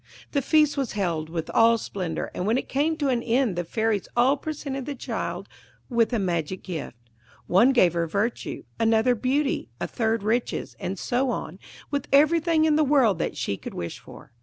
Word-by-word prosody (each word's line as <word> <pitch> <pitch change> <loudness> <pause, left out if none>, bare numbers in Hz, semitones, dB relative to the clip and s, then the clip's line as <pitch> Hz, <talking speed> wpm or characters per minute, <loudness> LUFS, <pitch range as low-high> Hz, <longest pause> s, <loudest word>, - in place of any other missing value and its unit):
The 280 - +1
feast 300 +1 +3
was 270 -4 -1
held 170 -6 -2
with 165 -1 -4
all 230 0 +5
splendour, 185 -6 -4
and 180 - -3
when 225 +3 +3
it - - -3
came 305 +4 0
to 290 -3 0
an 245 -2 +1
end 235 -3 +1
the 175 - -1
fairies 220 +3 -1
all 255 +4 +5
presented 280 -3 -5
the 290 - -3
child - - -4 0.4
with 235 -1 +2
a 240 - +1
magic 180 -2 -2
gift. 160 -9 -6 0.5
One 230 +9 +5
gave 185 -10 +4
her 170 -1 0
virtue, 205 +8 -2 0.2
another 225 +2 +3
beauty, 270 +5 0
a - - -1
third 225 -3 -1
riches, 230 +3 -1
and 190 +2 -4
so 250 +7 0
on, - - -4 0.3
with 285 -2 -2
everything 315 +2 +4
in 305 -1 +3
the 310 - +4
world 260 - +3
that - - -2
she 100 - -2
could - - -8
wish 85 - -5
for. - - -14
235 Hz, 190 wpm, -25 LUFS, 190-275 Hz, 0.5 s, all